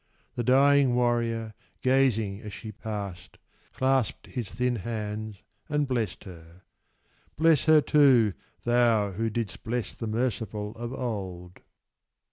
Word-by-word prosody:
The 120 - -2
dying 135 +1 +4
warrior, 115 -2 0 0.3
gazing 115 -6 +2
as 105 -2 -8
she 110 - -8
passed, 100 -4 -7 0.3
Clasped 130 -3 0
his 120 -5 -5
thin 125 -1 -1
hands 105 -1 -5 0.3
and 150 -1 +1
blessed 120 -5 -2
her. 85 -1 -13 0.7
Bless 160 -4 +4
her 155 -1 +6
too, 130 -9 +5 0.3
Thou, 120 -4 +3
who 110 +4 -2
didst 110 -2 -4
bless 115 -2 -3
the 115 - -5
merciful 110 -2 -2
of 120 +2 -6
old! 95 -9 -5
115 Hz, 120 wpm, -27 LUFS, 105-125 Hz, 0.7 s, her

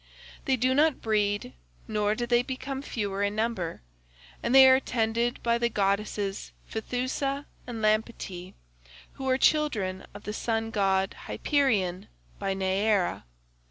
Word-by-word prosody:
They 265 - +3
do 255 +1 +2
not 300 +1 +3
breed, 205 -2 0 0.3
nor 210 0 +1
do 240 - -2
they 240 0 +3
become 265 +1 -5
fewer 200 -7 -3
in 205 +1 0
number, 215 - -2 0.6
and 235 +3 +1
they 265 0 +10
are 260 0 +7
tended 235 -1 -1
by 235 0 +2
the 235 0 +1
goddesses 200 -1 -1
Phaethusa 255 +5 -2 0.2
and 230 -3 -5
Lampetie, 215 -4 -1 0.6
who 265 -1 -4
are 260 - +3
children 220 -12 +1
of 205 - -9
the 210 - -4
sun 225 0 -1
god 195 -3 +1
Hyperion 210 - +1 0.3
by 195 0 -1
Neaera. 190 - +1
220 Hz, 135 wpm, -28 LUFS, 200-255 Hz, 0.6 s, they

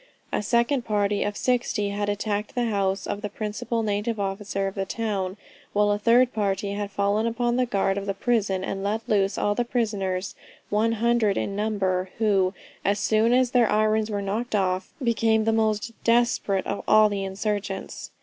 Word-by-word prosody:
A - - +1
second 235 +5 +1
party 205 -2 0
of 205 0 -3
60 240 -4 0
had 205 0 -2
attacked 205 +2 -2
the 245 -1 +1
house 195 -1 0
of 205 - -4
the 210 - -3
principal 215 +2 -3
native 210 +1 -1
officer 195 0 -2
of 195 - -4
the 195 - -2
town, 195 -2 -3 0.4
while 205 0 +3
a 205 - 0
third 245 +3 +4
party 200 -1 -1
had 205 0 -3
fallen 200 +3 +1
upon 240 +1 0
the 250 0 +1
guard 195 -3 +1
of 200 - -7
the 195 - -1
prison, 200 -5 0
and 195 0 -3
let 215 +3 -2
loose 195 -1 +1
all 205 - +1
the 240 - 0
prisoners, 200 -6 -2 0.4
one 220 +2 +2
hundred 230 -2 +2
in 195 - -2
number, 195 -3 0
who, 195 -4 +2 0.3
as 200 +1 +2
soon 220 +3 +2
as 250 0 +3
their 245 -4 +3
irons 215 0 +2
were 205 -1 -2
knocked 215 +4 -2
off, 185 -2 0
became 225 -2 +2
the 225 - +2
most 220 0 0
desperate 230 -4 +2
of 200 - -3
all 215 0 +6
the 200 -1 -2
insurgents." 195 0 -4
210 Hz, 185 wpm, -25 LUFS, 200-225 Hz, 0.4 s, all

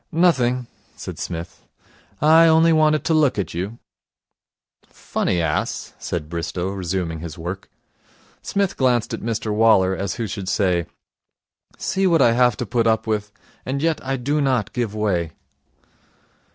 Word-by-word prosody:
'Nothing,' 130 -8 +2 0.3
said - - -8
Psmith. 85 0 -6 0.6
'I 160 +2 +7
only 160 +1 +5
wanted 155 -1 +3
to 165 - +1
look 150 -7 +3
at 95 -5 -3
you.' 95 +7 -4 1.1
'Funny 90 - -2
ass,' 80 -2 -2
said 75 - -4
Bristow, 85 +2 -3
resuming 90 -3 -3
his 80 -1 -7
work. 90 +4 -6 0.7
Psmith 200 -2 -1
glanced 125 -3 +1
at - - -4
Mr 110 -1 -2
Waller, 105 -4 +4
as 95 0 -3
who 115 - -3
should 100 -2 -5
say, 90 -5 +1 0.9
'See 190 0 0
what 170 -2 +3
I 115 - +5
have 120 -2 +3
to 125 - -3
put 115 +2 +1
up 110 -1 +2
with. 105 -1 -2 0.3
And 135 +2 -3
yet 160 +1 0
I 135 0 -2
do 145 +4 0
not 130 -6 0
give 115 -4 -2
way.' 90 -7 -1
110 Hz, 150 wpm, -21 LUFS, 95-140 Hz, 1.1 s, I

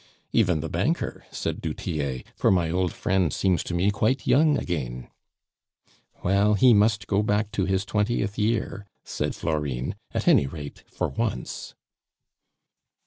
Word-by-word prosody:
"Even 90 -9 +2
the - - -3
banker," - - -1
said - - -4
du - - -3
Tillet, 70 -6 -3
"for - - +2
my 85 -4 +2
old 90 0 +1
friend 95 -4 0
seems 90 -4 +1
to 85 - -3
me 95 +4 +2
quite 110 +4 0
young 150 0 +4
again." 65 - -4 1.1
"Well, 100 +3 +3
he 125 +4 +6
must 105 +1 +3
go 100 0 +1
back 105 0 0
to 95 - 0
his 95 0 0
twentieth 105 -1 0
year," 105 -2 -1 0.2
said - - -3
Florine; 70 -5 -2 0.2
"at - - -3
any 70 - +5
rate, 70 0 -8
for - - -2
once." 110 - -4
95 Hz, 145 wpm, -25 LUFS, 80-105 Hz, 1.1 s, he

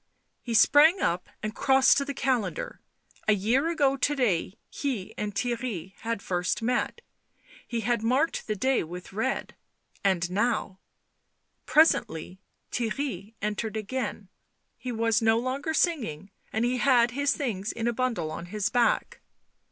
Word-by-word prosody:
He 235 -2 -3
sprang 310 - +6
up 175 +1 -1
and 215 0 -2
crossed 265 +1 +4
to 280 - -2
the 280 0 -5
calendar; 245 -9 -1 0.5
a 215 - +6
year 235 - +1
ago 285 -5 +2
to 290 +3 +1
day 205 -7 0
he 250 -10 -4
and 210 -1 -4
Theirry 230 -7 -3
had 230 -3 -3
first 180 +5 -1
met; 250 - 0 0.7
he 235 -1 -2
had 235 +1 0
marked 260 +8 +1
the 215 - -1
day 260 +6 +1
with 180 +3 -9
red 240 +6 -2 0.3
— - - -35
and 180 -3 +1
now 205 -2 0 0.9
Presently 190 - +2 0.3
Theirry 230 -3 -3
entered 215 +1 -2
again; 215 -2 -4 0.5
he 255 - -6
was 230 -1 +1
no 225 0 +4
longer 260 +6 -2
singing, 235 - 0 0.2
and 220 +2 0
he 250 +1 +1
had 245 -3 +4
his 280 +2 +1
things 225 -8 -2
in 230 0 -3
a 240 - +1
bundle 230 -11 -1
on 170 - -6
his 210 +1 -1
back. 240 -2 +1
230 Hz, 150 wpm, -27 LUFS, 200-265 Hz, 0.9 s, sprang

